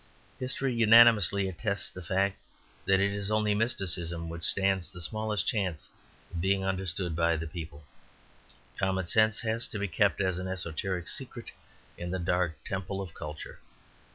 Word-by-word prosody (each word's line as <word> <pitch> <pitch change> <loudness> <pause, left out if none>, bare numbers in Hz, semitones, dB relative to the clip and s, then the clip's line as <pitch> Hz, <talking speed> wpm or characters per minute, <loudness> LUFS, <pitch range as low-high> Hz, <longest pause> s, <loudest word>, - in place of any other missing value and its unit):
History 130 0 -1
unanimously 115 -4 +6
attests 100 +1 -3
the 90 - -9
fact 95 +3 0 0.5
that 95 -1 +4
it 100 +1 +2
is 100 0 -3
only 105 -1 +2
mysticism 85 -6 -1
which 85 0 -6
stands 95 -2 +3
the 90 -2 -10
smallest 110 +1 -1
chance 95 -7 -2 0.4
of 85 - -3
being 95 +1 +1
understanded 90 -3 -2
of 85 -1 +2
the 80 - -4
people. 80 -2 -8 1.0
Common 95 -1 0
sense 110 +3 +3
has 115 +1 -1
to - - -5
be 100 0 -1
kept 85 - +2
as 95 -2 0
an 90 - -4
esoteric 90 0 -3
secret 120 -3 -4 0.5
in 85 - -4
the 95 - -1
dark 85 -3 -1
temple 95 0 -3
of 95 -4 -6
culture. 75 0 -8
95 Hz, 155 wpm, -29 LUFS, 85-105 Hz, 1.0 s, unanimously